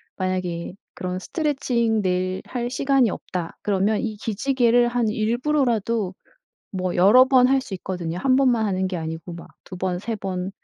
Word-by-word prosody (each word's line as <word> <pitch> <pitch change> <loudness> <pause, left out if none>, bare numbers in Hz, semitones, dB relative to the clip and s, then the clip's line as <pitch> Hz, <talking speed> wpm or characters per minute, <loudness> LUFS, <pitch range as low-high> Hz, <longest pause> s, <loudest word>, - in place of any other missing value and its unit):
만약에 185 -2 -3 0.2
그런 180 0 -4
스트레칭 245 - 0
매일 185 0 -1
할 240 -1 -3
시간이 270 -3 +2
없다 180 -2 -5
그러면 205 +1 +1
이 220 -2 -3
기지개를 240 +2 +2
한 240 -2 0
일부러라도 230 -3 0 0.6
뭐 185 -2 -2
여러 210 +8 +7
번 255 -2 +5
할 270 0 +3
수 220 -7 -7
있거든요. 180 -2 -4
1 255 +5 +2
번만 245 -5 +3
하는 190 -1 0
게 185 -1 -3
아니고 160 +1 -6
막 170 - -10 0.2
2 185 - -9
번, 180 -1 -2
3 220 +3 -4
번, 190 -1 -4
210 Hz, 295 characters per minute, -23 LUFS, 185-245 Hz, 0.6 s, 여러